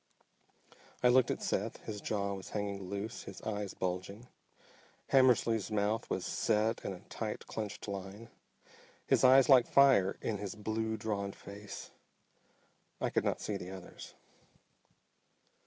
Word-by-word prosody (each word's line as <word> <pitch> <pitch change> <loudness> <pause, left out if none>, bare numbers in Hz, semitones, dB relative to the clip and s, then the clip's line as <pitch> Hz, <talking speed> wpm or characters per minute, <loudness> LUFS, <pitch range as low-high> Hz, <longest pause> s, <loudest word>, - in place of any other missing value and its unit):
I 125 - +7
looked 125 0 +5
at - - -2
Seth. - - -1
His 105 -2 -5
jaw 100 -2 -1
was 95 -1 -7
hanging 100 -2 -4
loose, 100 +3 -4
his - - -8
eyes 105 -3 -3
bulging. 95 +5 -4 0.9
Hammersly's 120 -5 +4
mouth 105 +1 0
was - - -2
set 110 +2 +1
in - - -3
a 90 -1 -8
tight 105 +1 -5
clenched 105 -2 -5
line, 100 +3 -6 0.8
his - - +3
eyes 130 +1 +7
like 130 -4 +7
fire 135 -9 +5
in 105 -3 -2
his 100 -1 -5
blue, 110 +1 -2
drawn 100 -3 -2
face. 100 0 -9 1.1
I - - -1
could - - +1
not - - -1
see 105 - -2
the 90 -1 -7
others. 95 -1 -10
105 Hz, 140 wpm, -33 LUFS, 100-115 Hz, 1.1 s, I